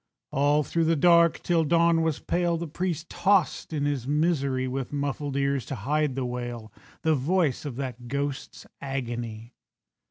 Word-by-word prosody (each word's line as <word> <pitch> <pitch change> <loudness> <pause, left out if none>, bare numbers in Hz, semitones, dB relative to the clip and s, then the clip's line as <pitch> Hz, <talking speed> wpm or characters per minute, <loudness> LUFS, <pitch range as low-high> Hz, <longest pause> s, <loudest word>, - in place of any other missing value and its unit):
All 145 +2 +3
through 165 +4 0
the 165 +1 +3
dark, 170 +1 +4
till 170 -2 +2
dawn 170 +1 +3
was 160 -2 0
pale, 175 -1 0
The 170 - -4
priest 170 +1 -3
tossed 195 -5 +1
in 145 -2 -1
his 140 -4 -1
misery, 140 -4 +1
With 130 0 -4
muffled 145 -1 -2
ears 140 -2 +1
to 135 - -3
hide 145 +4 0
the 135 -2 -2
wail, 120 -3 -5 0.3
The 160 - +3
voice 150 0 +1
of 140 -5 -4
that 125 -2 -5
ghost's 140 +1 -4 0.2
agony. 120 -4 -5
145 Hz, 160 wpm, -26 LUFS, 130-165 Hz, 0.3 s, dark